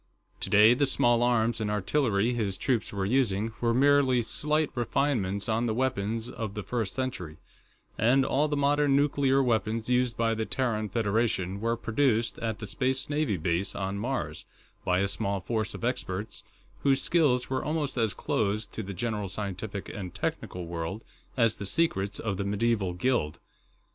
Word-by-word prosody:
Today, 105 +3 +6
the 140 +3 +2
small 120 -2 +3
arms 120 -1 +2
and 105 - -1
artillery 105 +1 +1
his 105 -5 -1
troops 125 -5 0
were 100 -1 -2
using 110 -2 +1
were 115 -1 +2
merely 130 -1 +4
slight 150 +5 0
refinements 115 -5 0
on 115 +1 +1
the 110 - -1
weapons 115 -3 -1
of 110 -4 -5
the 105 - -4
First 115 -4 -2
Century, 90 -13 -4 0.6
and 130 +5 +4
all 145 +3 +2
the 145 -1 -1
modern 145 0 +3
nuclear 140 -1 +3
weapons 115 -1 0
used 125 -1 +2
by 115 -1 +2
the 110 0 -1
Terran 110 -5 -1
Federation 100 -3 0
were 115 +1 0
produced 115 -1 +1
at 110 -2 -2
the 105 - -6
Space 130 +7 -2
Navy 145 -9 0
base 85 +3 -1
on 95 +1 -3
Mars, 105 - -3 0.4
by 90 +1 +2
a 100 - +2
small 100 0 -1
force 110 +3 -2
of - - -9
experts 105 -5 -3 0.4
whose 135 +2 +3
skills 140 -8 +2
were 130 - 0
almost 150 -3 -1
as 115 -4 0
closed 105 +1 -1
to - - -3
the 100 -2 -6
general 105 0 -2
scientific 100 0 -5
and 90 -3 -7
technical 90 -1 -3
world 85 +5 -4 0.3
as 115 -3 +3
the 100 - -5
secrets 100 -8 +1
of 100 -4 -3
a - - 0
medieval 105 -2 0
guild. 90 - 0
115 Hz, 170 wpm, -28 LUFS, 100-130 Hz, 0.6 s, Today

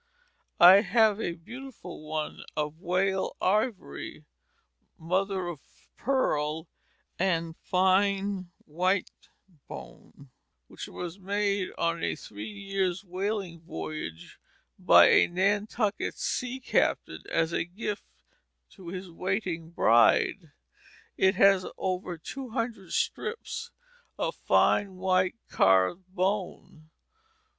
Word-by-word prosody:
I 180 +3 +10
have 215 +1 +3
a 170 - -1
beautiful 235 - -10
one 155 0 -3 0.2
of 150 +1 -2
whale 190 +1 0
ivory, 210 - -1 0.7
mother 185 +3 -1
of 175 -4 -5 0.4
pearl, 160 - 0 0.5
and 165 -3 0
fine 190 +1 +1 0.2
white 180 +4 0 0.6
bone 70 - -12 0.4
which - - -8
was 175 +2 -7
made 200 0 0
on 170 0 0
a - - 0
three 105 - -8
years' 195 -2 -2
whaling 190 -1 -3
voyage 80 - -7 0.4
by - - +7
a - - +6
Nantucket 205 +3 0
sea 250 +1 -2
captain 255 - 0
as 165 0 +1
a - - +1
gift 205 +4 -5 0.7
to 185 - -13
his 180 +1 -6
waiting 180 -2 -2
bride; 145 - +3 0.6
it 190 +1 +3
has 195 -1 +5
over 180 -2 -2
two 255 - -7
hundred 225 -5 -4
strips 460 0 -2 0.5
of - - -1
fine 195 -2 +2
white 185 +1 +1
carved 95 - +3
bone. 185 -4 -3
185 Hz, 100 wpm, -28 LUFS, 165-200 Hz, 0.7 s, I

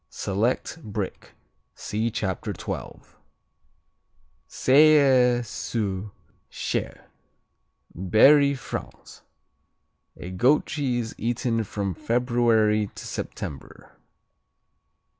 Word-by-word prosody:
Select 115 - -2
Brick 105 -5 -6 0.4
see 110 +2 -2
Chapter 95 -5 -3
12. - - -8 1.3
Selles 130 -4 +4
sur 105 -3 -3 0.4
Cher - - -4 0.9
Berry, 140 - +5
France 130 - -8 1.0
A 90 - -8
goat 125 +11 +3
cheese, 125 -6 -2
eaten 115 0 -1
from 100 -2 -3
February 115 -1 +1
to - - -9
September. 70 - -7
115 Hz, 70 wpm, -25 LUFS, 105-130 Hz, 1.3 s, Berry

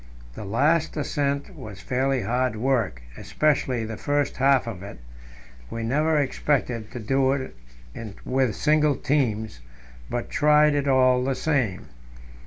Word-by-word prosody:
The 105 - -8
last 150 +11 +1
ascent 145 +3 -2
was 110 -10 -9
fairly 130 +3 -1
hard 125 +3 0
work, 110 - -1
especially 130 -6 0
the 110 -1 -6
first 145 -1 -1
half 135 0 +3
of 110 -6 -6
it. 100 -6 -9 0.7
We 115 - -5
never 150 +7 +1
expected 130 -5 -1
to 125 - -5
do 135 +4 +1
it 130 - -5 0.7
with 130 -5 +1
single 150 -1 +2
teams, 115 - -1 0.5
but 120 - -4
tried 150 0 +4
it 145 -1 0
all 130 -1 +4
the 135 0 0
same. 130 -12 -1
130 Hz, 135 wpm, -24 LUFS, 115-145 Hz, 0.7 s, tried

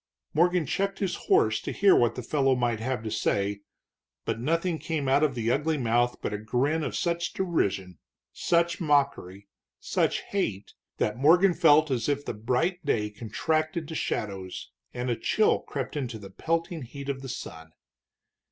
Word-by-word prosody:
Morgan 175 +1 +3
checked 195 +7 -1
his 195 -3 -1
horse 110 0 +3
to - - -4
hear 200 -1 +5
what 120 -1 +3
the 125 - -5
fellow 135 0 +2
might 120 -3 0
have 125 0 -2
to 110 - -4
say, 100 0 0 0.6
but 115 0 -2
nothing 165 +5 0
came 155 -4 -2
out 135 +2 +4
of 150 -4 +2
the 115 -1 0
ugly 150 +4 +1
mouth 120 -1 +1
but - - -2
a 105 - -3
grin 130 +9 0
of 140 - -3
such 170 0 -1
derision, 100 - -1 0.3
such 170 +1 +1
mockery, 140 - 0 0.3
such - - 0
hate, 105 - -3 0.2
that 125 - -1
Morgan 175 +6 +5
felt 155 -3 +5
as 120 0 0
if 145 0 -1
the - - -3
bright 130 - -1
day 105 -7 0
contracted 155 +9 -2
to - - -5
shadows 95 - -4 0.2
and 125 0 -3
a - - +1
chill 215 - +2
crept 135 -1 -5
into 125 -6 -3
the 100 -2 -11
pelting 165 - -2
heat 140 +3 -8
of 135 -1 -3
the 135 - -7
sun. 80 -8 -8
135 Hz, 170 wpm, -27 LUFS, 115-160 Hz, 0.6 s, hear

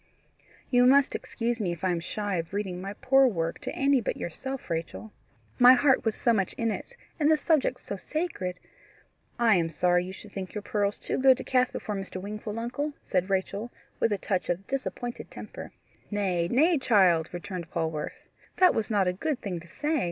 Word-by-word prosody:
"You 245 -1 +5
must 275 +1 +5
excuse 235 0 -2
me 180 -4 0
if 170 +1 -11
I 185 - +2
am 175 - 0
shy 200 +3 -3
of 165 +2 -4
reading 190 -3 -3
my 195 +1 -5
poor 270 0 +5
work 165 -7 -2
to - - -5
any 275 -1 +3
but - - -2
yourself, 265 - -5
Rachel. 165 +6 -4 0.5
My 250 +1 +10
heart 265 +1 +4
was 225 -2 -2
wo 235 - +6
much 195 -4 0
in 230 -1 -1
it, 485 - -6 0.2
and 300 -1 +3
the 315 - +5
subject 310 -3 +2
is - - -21
so 200 - -4
sacred 190 - -3 0.4
" - - -40
"I 230 -2 +5
am 165 -1 +1
sorry 175 +2 +2
you 185 - -6
should 200 +3 -11
think 190 0 -6
your 210 - -4
pearls 205 -3 0
too - - -3
good 260 -1 +6
to - - -6
cast 255 -1 +2
before 210 - -4
Mr. 195 -1 -5
Wingfold, 210 +2 -6
uncle," 285 +6 -3
said 185 0 0
Rachel, 195 +4 -1 0.3
with 230 - +2
a 205 - +1
touch 190 -1 -2
of 175 +3 -1
disappointed 245 -2 -4
temper. - - -9 0.4
"Nay, 185 -5 0
nay, 305 - +3
child," 185 -10 +4
returned 175 -1 -6
Polwarth, 160 -2 -4 0.3
"that 365 -1 +6
was 220 0 -1
not 200 -4 +2
a 180 - +1
good 290 +8 -2
thing 180 -4 -4
to 170 - -14
say. 300 - -1
205 Hz, 205 wpm, -28 LUFS, 180-255 Hz, 0.5 s, My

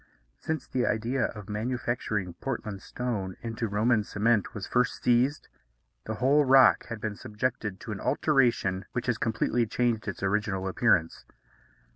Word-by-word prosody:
Since 160 -3 -3
the 125 -2 0
idea 115 +4 0
of 105 -3 -7
manufacturing 110 -4 -2
Portland 105 -1 -5
stone 105 -8 -4
into 115 0 -3
Roman 110 +2 +2
cement 105 +1 0
was 105 - -4
first 125 0 0
seized, 125 +5 +2 0.6
the 110 - -3
whole 140 +6 +4
rock 135 -1 +6
has 115 - -5
been 105 -1 -4
subjected 105 -3 -3
to 110 - -6
an 100 - -4
alteration 120 -10 +1
which 120 - -2
has 120 -3 0
completely 115 +1 0
changed 115 -1 0
its 100 -1 -5
original 100 -1 0
appearance. 95 -6 +1
115 Hz, 145 wpm, -28 LUFS, 105-125 Hz, 0.6 s, rock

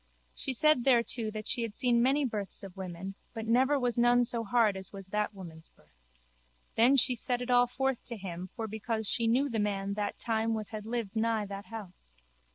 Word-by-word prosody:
She 265 - -3
said 305 0 +3
thereto 235 -3 +2
that 215 0 -6
she 245 - 0
had 225 -2 -4
seen 240 -2 +2
many 275 +3 +3
births 210 -4 -2
of 195 -2 -9
women 190 0 -6 0.2
but 225 -1 -4
never 260 +5 +3
was 245 -2 0
none 240 +1 +5
so 235 -1 0
hard 225 -2 +2
as 190 0 -7
was 195 -2 -10
that 210 +1 -1
woman's 165 -4 -10
birth. 65 -5 -30 0.7
Then 240 +5 +6
she 260 -1 +4
set 245 +1 -1
it 250 0 -3
all 245 0 +5
forth 265 0 -1
to 235 - -3
him 185 -2 -6
for 225 - -4
because 220 0 -2
she 230 +2 +2
knew 255 +5 +3
the 230 -5 -2
man 200 -1 -1
that 205 0 -3
time 225 0 0
was 215 0 -5
had 215 -1 -6
lived 230 -3 -3
nigh 220 -1 +1
that 200 0 -8
house. 185 - -10
225 Hz, 210 wpm, -30 LUFS, 200-245 Hz, 0.7 s, Then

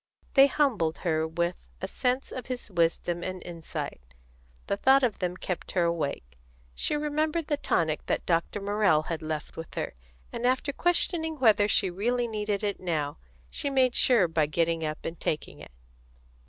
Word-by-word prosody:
They 275 0 +8
humbled 230 - +1
her 160 -1 +1
with, 170 - -2
a - - -3
sense 255 +1 -1
of 255 - -6
his 245 -4 -5
wisdom 170 0 +1
and 185 +1 -4
insight; 170 - -6 0.6
the - - 0
thought 265 +6 +5
of 235 -5 +1
them 180 -1 -2
kept 180 -2 -4
her 180 - +3
awake. 140 - -2 0.3
She 300 - 0
remembered 305 +2 0
the 295 -1 0
tonic 160 - 0
that - - -1
Dr. 170 +4 0
Morrell 200 -6 +3
had 165 0 -4
left 155 -1 -5
with 165 0 -8
her, - - -3 0.4
and 235 +1 0
after 260 +3 +1
questioning 330 -1 +1
whether 215 -6 +5
she 190 -2 +2
really 240 +6 0
needed 210 -2 -2
it 205 -1 -1
now, 155 -4 -2 0.3
she 285 - -2
made 260 -2 +3
sure 230 -8 +4
by 160 -2 +1
getting 165 +2 0
up 155 0 -4
and 165 0 -5
taking 110 - -3
it. 75 - -11
185 Hz, 170 wpm, -28 LUFS, 165-255 Hz, 0.6 s, They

